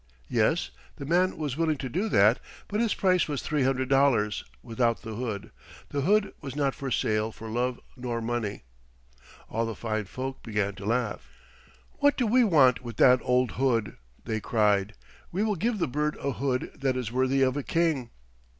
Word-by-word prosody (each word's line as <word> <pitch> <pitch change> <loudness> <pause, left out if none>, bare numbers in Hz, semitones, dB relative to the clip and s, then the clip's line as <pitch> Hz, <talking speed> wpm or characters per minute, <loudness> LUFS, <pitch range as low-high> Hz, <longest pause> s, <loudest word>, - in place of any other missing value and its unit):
Yes, - - +1 0.2
the 140 - -7
man 180 +5 +2
was 150 -4 -3
willing 160 -2 +1
to 135 - -4
do 190 - -1
that, 105 - +5 0.3
but 210 - -2
his 230 -2 +1
price 185 -3 +2
was 145 -3 -3
three 150 -2 0
hundred 130 0 +1
dollars 135 -6 +2 0.2
without 115 0 0
the 110 -1 -6
hood; 110 -3 -4 0.4
the 140 - -2
hood 205 +6 +2
was 135 -3 -6
not 140 -2 +1
for 140 -2 -5
sale 110 -2 0
for 110 0 -9
love 125 +2 -1 0.2
nor 125 -2 -3
money. 115 -3 -3 0.8
All 115 - -1
the 115 - -4
fine 110 -2 -2
folk 130 +6 -6
began 105 -2 -1
to 100 0 -9
laugh. 110 - -1 0.7
"What 285 0 +4
do 250 - +1
we 245 +3 +4
want 135 - +5
with 120 -4 -8
that 125 0 +6
old 125 -1 +2
hood?" 115 -6 +1 0.3
they 110 -2 -1
cried. 105 -2 +1 0.4
"We 195 +4 0
will 215 -2 +1
give 225 +3 0
the 175 - 0
bird 150 +3 -1
a 140 - -2
hood 130 +2 -2
that 135 -2 0
is 120 -3 -3
worthy 130 +2 +2
of 130 0 +2
a 145 - -1
king." 155 -6 0
130 Hz, 185 wpm, -27 LUFS, 115-150 Hz, 0.8 s, that